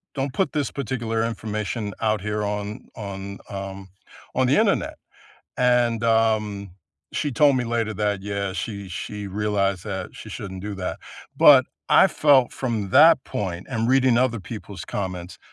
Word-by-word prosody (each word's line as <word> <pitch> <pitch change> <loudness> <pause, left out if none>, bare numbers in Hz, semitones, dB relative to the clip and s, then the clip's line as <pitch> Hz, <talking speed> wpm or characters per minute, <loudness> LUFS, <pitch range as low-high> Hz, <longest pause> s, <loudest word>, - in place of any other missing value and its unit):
don't 135 -1 -2
put 190 - 0
this 150 -3 -1
particular 115 -4 -2
information 110 -1 -3
out 110 -2 +1
here 105 +1 -2
on 105 +1 -4
on, 100 -1 -7
um, 95 -1 -7 0.5
on - - +3
the - - +3
Internet." - - +1 0.6
And, 120 -2 +2
um, 110 -3 +1 0.4
she 145 - -1
told 140 +2 +4
me 125 - 0
later 115 -2 -1
that, 105 -2 -1
yeah, 100 -1 -3
she 100 +1 -5
she 100 +3 -6
realized 100 -2 -1
that 95 -3 -5
she - - -10
shouldn't 95 -2 -7
do 105 -1 -4
that. 95 -1 -4 0.4
But - - +7 0.2
I - - +7
felt 140 -4 +4
from 110 -7 -3
that 155 - +7
point 90 -3 -4
and 115 -2 -1
reading 130 -2 +4
other 125 -3 +1
people's 85 - -8
comments, 90 -2 -5
105 Hz, 155 wpm, -23 LUFS, 100-120 Hz, 0.6 s, But